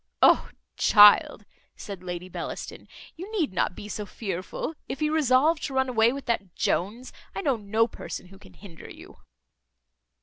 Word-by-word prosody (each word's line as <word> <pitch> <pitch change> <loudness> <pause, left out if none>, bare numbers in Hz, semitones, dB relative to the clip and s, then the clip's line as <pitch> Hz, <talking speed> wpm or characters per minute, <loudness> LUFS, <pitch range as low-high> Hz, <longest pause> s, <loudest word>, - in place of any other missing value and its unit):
"O - - +5 0.3
child!" 205 0 +6 0.3
said 200 -3 -8
Lady 180 0 -6
Bellaston, 185 - -7 0.3
"you 370 +6 -9
need 345 - -1
not 180 - 0
be 205 - -9
so 210 0 -5
fearful; 195 - -5 0.2
if - - -5
you 305 0 0
resolve 300 +2 +3
to 275 -3 -5
run 265 0 +1
away 230 -1 +3
with 275 +1 -7
that 200 -6 -2
Jones, 225 +8 -2 0.2
I - - -3
know 280 -8 +1
no 220 +1 +1
person 185 - -8
who 195 0 -15
can - - -17
hinder 175 -6 -13
you." - - -13
225 Hz, 165 wpm, -26 LUFS, 195-275 Hz, 0.3 s, child